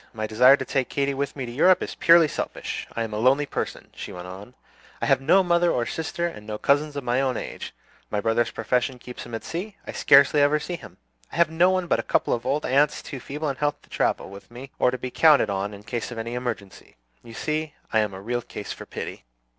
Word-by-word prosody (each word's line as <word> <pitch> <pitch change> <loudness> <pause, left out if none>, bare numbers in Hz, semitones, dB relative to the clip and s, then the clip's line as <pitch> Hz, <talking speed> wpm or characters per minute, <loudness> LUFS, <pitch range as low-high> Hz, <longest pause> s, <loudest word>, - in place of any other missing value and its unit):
My 110 -1 -3
desire 125 +6 +6
to - - -4
take 135 -3 -1
Katy 140 0 0
with 140 0 -3
me 135 -3 -4
to 120 - -7
Europe 180 +9 +4
is - - -5
purely 170 -1 +6
selfish. - - -4
I 115 - -1
am 110 -1 -5
a 105 - -2
lonely 135 +5 +3
person," - - -5
she - - -7
went 90 0 -8
on; 100 +7 -10 0.4
"I - - -1
have - - +3
no 185 +8 +5
mother 175 -1 +3
or 120 - 0
sister, 165 +4 -3
and 105 -11 -6
no 105 -1 -4
cousins 145 +4 +1
of 140 - -4
my 125 +2 +1
own 130 -3 0
age. - - -6 0.4
My 105 - -1
brother's 115 +2 +1
profession 125 +3 -1
keeps 125 0 -9
him 115 - -6
at 115 - -6
sea; 195 +5 -5
I - - -5
scarcely 140 +1 +5
ever 145 +1 +4
see 175 +4 -4
him. 100 - -12 0.3
I - - -9
have 170 -1 +3
no 170 +3 +4
one 185 -1 +1
but - - +1
a - - +1
couple - - +1
of 120 +1 -3
old 145 +3 0
aunts, 140 +3 +2
too 135 - -7
feeble 150 +5 -5
in 135 - -3
health 145 -1 -1
to - - -24
travel - - -1
with 100 0 -12
me 125 +3 -10
or - - +4
to 130 - -3
be 125 0 -6
counted 150 -8 +5
on 100 +1 -2
in 100 0 -11
case 120 +1 -4
of 120 - -8
any 115 +1 -4
emergency. 120 -6 -6 0.3
You 115 -1 -11
see, 155 +1 -3 0.2
I 110 - +4
am 105 -3 -1
a 95 - -8
real 120 +4 -2
case - - -8
for - - -11
pity." - - -7
130 Hz, 250 wpm, -25 LUFS, 115-150 Hz, 0.4 s, desire